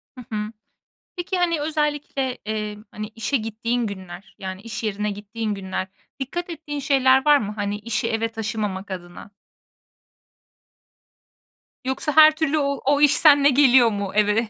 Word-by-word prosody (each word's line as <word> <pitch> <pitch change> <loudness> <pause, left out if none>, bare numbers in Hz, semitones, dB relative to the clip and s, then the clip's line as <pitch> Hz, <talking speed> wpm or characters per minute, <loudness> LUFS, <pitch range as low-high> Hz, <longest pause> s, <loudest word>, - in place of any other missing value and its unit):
Hı 250 - -10
hı. 210 +1 -3 0.7
Peki, 360 +1 -3
hani, 340 -3 +1
özellikle, 295 -4 -2
eee, 210 -1 -3
hani, 215 0 -6
işe 230 +5 -2
gittiğin 230 +1 -2
günler, 190 -1 -9
yani 190 0 -6
iş 230 0 -6
yerine 210 0 -1
gittiğin 210 +1 -4
günler, 190 -1 -4 0.3
dikkat 345 +7 -4
ettiğin 300 -3 -5
şeyler 265 -1 +3
var 295 -1 +6
mı? 210 -4 -4
Hani 205 0 -2
işi 230 +1 -2
eve 225 0 0
taşımamak 210 -3 -4
adına? 175 +2 -8 2.6
Yoksa 265 +3 -1
her 310 0 +8
türlü 315 -1 0
o 280 -1 -1
o 285 +1 +3
iş 295 -1 +6
seninle 285 -2 +6
geliyor 260 -3 +6
mu 200 -2 -3
eve? 210 +2 +2
230 Hz, 145 wpm, -23 LUFS, 210-285 Hz, 2.6 s, her